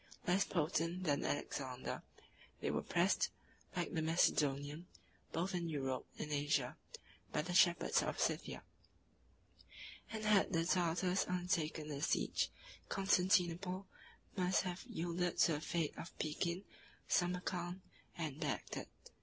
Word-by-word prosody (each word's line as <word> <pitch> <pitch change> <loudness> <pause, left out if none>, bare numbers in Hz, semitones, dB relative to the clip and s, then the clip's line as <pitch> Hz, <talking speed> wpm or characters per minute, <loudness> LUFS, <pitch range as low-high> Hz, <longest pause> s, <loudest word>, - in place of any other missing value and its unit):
Less 185 +2 +3
potent 165 +2 0
than 145 -4 +1
Alexander, 130 -3 -3 0.6
they - - 0
were - - 0
pressed, - - +2 0.5
like - - -1
the 160 - +1
Macedonian, 150 -1 +2 0.4
both 180 +4 -1
in 170 -2 -1
Europe 135 -4 -2
and 150 - -4
Asia, 145 -3 +1 0.6
by 150 - 0
the 180 +2 -3
shepherds 175 -1 +5
of - - -2
Scythia; - - 0 1.5
and 220 -1 -3
had 205 -2 +4
the 165 0 +2
Tartars 180 +1 +2
undertaken 170 -4 0
the 140 -1 -4
siege, - - +1 0.4
Constantinople 185 -1 +2 0.5
must 185 0 +2
have 180 -1 -3
yielded 175 -6 -1
to - - +5
the 150 - -2
fate 160 -1 -1
of 165 - -8
Pekin, 170 +4 -1 0.4
Samarcand, 180 0 0 0.4
and 155 -4 -3
Bagdad. 150 -5 -3
170 Hz, 120 wpm, -38 LUFS, 150-180 Hz, 1.5 s, shepherds